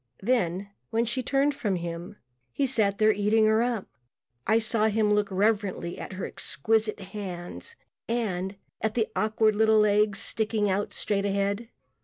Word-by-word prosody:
Then 200 -4 0 0.2
when 230 +1 +1
she 245 +3 -2
turned 275 +3 +1
from 210 -8 -1
him 170 +3 -5 0.4
he 280 - 0
sat 215 -6 +1
there 215 0 +5
eating 210 +2 +3
her 220 +1 +4
up. 235 -4 -1 0.6
I 220 +2 +4
saw 225 -1 +2
him 215 -1 +2
look 210 -1 +1
reverently 200 -3 0
at - - -7
her 185 - -4
exquisite 215 +7 -1
hands 190 - -7 0.3
and 200 -5 -2 0.3
at 220 0 -1
the 225 -2 +1
awkward 215 0 +2
little 220 0 +4
legs 210 0 +3
sticking 220 -2 0
out 200 +1 -1
straight 200 -1 -1
ahead. 200 +3 -1
210 Hz, 155 wpm, -27 LUFS, 200-225 Hz, 0.6 s, there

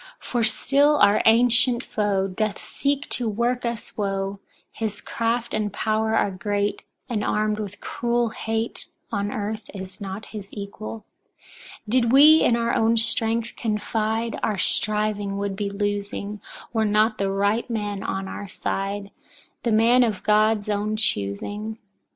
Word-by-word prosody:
For 240 -2 -2
still 280 +6 +3
our 205 -5 +5
ancient 245 +2 +5
foe 200 -2 0
doth 205 +2 -2
seek 285 0 -2
to 240 -3 0
work 240 +4 0
us 235 -1 -5
woe; 195 -1 -2 0.3
his 220 -2 -4
craft 235 +1 -2
and 210 -1 -1
power 220 +2 0
are 205 - +2
great, 205 +2 -1 0.3
and 225 -5 -2
armed 215 0 0
with 205 -1 -6
cruel 240 0 0
hate, 225 0 -3 0.2
on 205 -2 -1
earth 215 +1 -4
is 190 +1 -8
not 195 +2 -5
his 200 -2 -7
equal. 210 +2 -7 0.8
2. - - -9
Did 235 -1 +1
we 305 +4 +8
in 235 - +4
our 235 0 0
own 230 +1 +3
strength 225 +1 +1
confide, 220 +1 -1
our 210 - 0
striving 210 0 +1
would 200 -1 -2
be 200 0 -2
losing, 205 0 -3 0.3
were 220 -1 +2
not 215 +1 +2
the 195 -1 +1
right 200 +4 0
man 205 -3 -3
on 195 -1 -3
our 200 +1 -6
side, 200 +1 -3 0.5
the 235 - 0
man 230 +3 +5
of 220 -5 -1
God's 215 0 +3
own 210 +1 -1
choosing. 210 - -1
215 Hz, 150 wpm, -24 LUFS, 205-230 Hz, 0.8 s, we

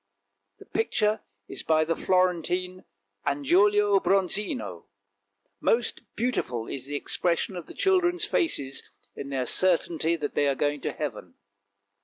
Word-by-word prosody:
The - - -14
picture 215 -1 0 0.3
is - - -5
by 155 -1 +3
the 165 +1 0
Florentine 180 0 0 0.4
Angiolo 200 +8 +4
Bronzino; 190 - -1 0.7
most 235 0 +1
beautiful 170 - -1
is 135 -1 -5
the 145 - -4
expression 170 +5 -1
of 175 -3 -7
the - - -10
children's 360 -2 +2
faces 140 - -1 0.3
in 140 - -6
their 130 -2 -1
certainty 170 +1 +2
that 150 -3 -4
they 145 - +2
are 140 - +2
going 145 +1 0
to - - -2
heaven. 110 - -6
170 Hz, 130 wpm, -27 LUFS, 145-205 Hz, 0.7 s, Angiolo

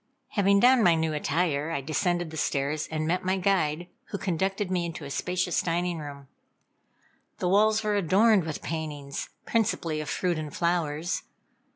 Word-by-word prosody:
Having 200 -1 +3
donned 250 -1 +6
my 175 -3 +6
new 160 -1 0
attire, 150 0 0
I 165 - -1
descended 175 +3 -1
the - - -8
stairs 145 +1 -1
and 155 -1 -2
met 180 +3 0
my 190 +1 +1
guide, 175 -4 +1 0.2
who 200 - -4
conducted 190 +1 -1
me 180 -2 +1
into 165 -3 -5
a 140 - -7
spacious 180 +2 0
dining 175 0 -1
room. 140 -2 -8 1.1
The 180 - -1
walls 215 +3 +4
were 210 0 +1
adorned 200 +2 +4
with 160 -1 -5
paintings, 150 -4 -4 0.2
principally 170 -8 0
of 150 - -6
fruit 175 -3 0
and 155 -1 -5
flowers. 170 -1 -1
170 Hz, 165 wpm, -27 LUFS, 155-190 Hz, 1.1 s, donned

